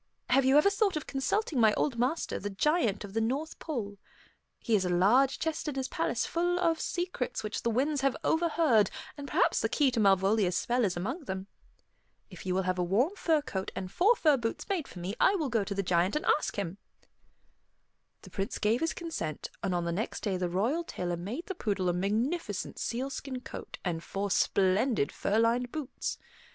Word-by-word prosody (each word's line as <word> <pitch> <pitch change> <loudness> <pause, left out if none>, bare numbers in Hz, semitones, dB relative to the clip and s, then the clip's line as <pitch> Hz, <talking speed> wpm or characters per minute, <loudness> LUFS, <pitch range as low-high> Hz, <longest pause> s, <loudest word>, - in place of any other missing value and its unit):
Have 270 +1 +5
you 265 +2 +5
ever 350 +7 +5
thought 400 -4 +1
of 305 - -5
consulting 275 - -1
my 220 -2 +5
old 245 -6 0
master, 260 +7 0
the 205 - -4
Giant 220 - +1
of 200 -1 -9
the 225 - +1
North 275 +8 -2
Pole? 210 -10 -4 0.6
He 230 - -2
has 200 -3 +4
a 180 - -1
large 215 +10 +4
chest 320 0 -2
in 295 - -2
his 265 -1 -2
palace - - -1
full 350 +1 0
of 330 -2 +1
secrets 345 -10 -2
which 215 0 -3
the 235 - 0
winds 275 +5 +1
have 270 -1 +1
overheard, 320 - +3 0.3
and 285 -1 -7
perhaps - - +2
the - - 0
key 285 -3 +3
to 240 - -1
Malvolia's 195 -1 +3
spell 245 +1 +1
is 185 -3 -1
among 260 - -3
them. 190 -3 -4 0.9
If 180 +1 -10
you 180 - 0
will 190 - +1
have 185 0 -1
a - - +2
warm 235 - +1
fur 320 -6 +1
coat 190 -8 -4
and 185 -1 -5
four 420 +7 +4
fur 305 -9 +4
boots 230 -2 -3
made 365 -7 -1
for - - -12
me, 180 +3 -4
I 395 - +5
will 310 -7 -1
go 225 -3 +1
to 200 0 -4
the 195 - 0
Giant 180 +3 +2
and 300 - -1
ask 300 - +2
him." 195 -1 -4 1.4
The - - -13
Prince 200 +5 -3
gave 220 +4 +1
his 325 - 0
consent, 325 - -4
and 190 -2 -1
on 175 -1 -1
the 170 - -1
next 200 +7 -3
day 200 -3 0
the 180 -1 -1
royal 230 - 0
tailor 175 - -3
made 215 - -5
the 385 - -4
poodle 200 - -1
a - - +1
magnificent 210 - -1
sealskin 260 +1 -3
coat - - -8
and 170 -2 -2
four 200 0 -3
splendid 195 - +2
fur 205 - -1
lined 235 +2 +2
boots. 295 -4 -4
235 Hz, 205 wpm, -30 LUFS, 195-300 Hz, 1.4 s, Have